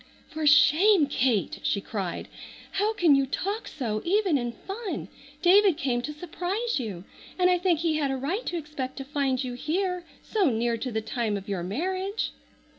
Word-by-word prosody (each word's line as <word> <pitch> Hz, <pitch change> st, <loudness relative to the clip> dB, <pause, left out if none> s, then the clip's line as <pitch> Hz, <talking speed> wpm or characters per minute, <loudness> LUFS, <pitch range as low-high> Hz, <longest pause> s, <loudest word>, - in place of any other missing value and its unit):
"For 310 Hz, -1 st, -2 dB
shame, 305 Hz, +5 st, +6 dB
Kate!" 250 Hz, -7 st, 0 dB
she 200 Hz, -, 0 dB
cried. 195 Hz, -3 st, -4 dB, 0.4 s
"How 415 Hz, +2 st, +1 dB
can 340 Hz, -7 st, +5 dB
you 275 Hz, -1 st, +3 dB
talk 400 Hz, -, -3 dB
so, 220 Hz, -7 st, -3 dB
even 380 Hz, -2 st, +2 dB
in 240 Hz, -3 st, -1 dB
fun! 390 Hz, -, -5 dB, 0.3 s
David 380 Hz, -1 st, +6 dB
came 255 Hz, -6 st, 0 dB
to 300 Hz, -, -4 dB
surprise 355 Hz, +7 st, -2 dB
you, 200 Hz, -8 st, -5 dB, 0.3 s
and 365 Hz, 0 st, +4 dB
I 360 Hz, -, +3 dB
think 345 Hz, -3 st, +2 dB
he 325 Hz, -2 st, +1 dB
had 290 Hz, -3 st, 0 dB
a 270 Hz, -, -1 dB
right 330 Hz, -, -2 dB
to 350 Hz, -, -1 dB
expect 290 Hz, -5 st, -5 dB
to 270 Hz, -, -4 dB
find 275 Hz, -2 st, 0 dB
you 250 Hz, -1 st, -4 dB
here 360 Hz, +7 st, -1 dB, 0.2 s
so 400 Hz, -8 st, +2 dB
near 235 Hz, 0 st, 0 dB
to 245 Hz, +3 st, -4 dB
the 220 Hz, -1 st, -1 dB
time 220 Hz, -1 st, -2 dB
of 195 Hz, +1 st, -9 dB
your 195 Hz, -3 st, -2 dB
marriage." 370 Hz, -, -2 dB
300 Hz, 185 wpm, -27 LUFS, 245-365 Hz, 0.4 s, shame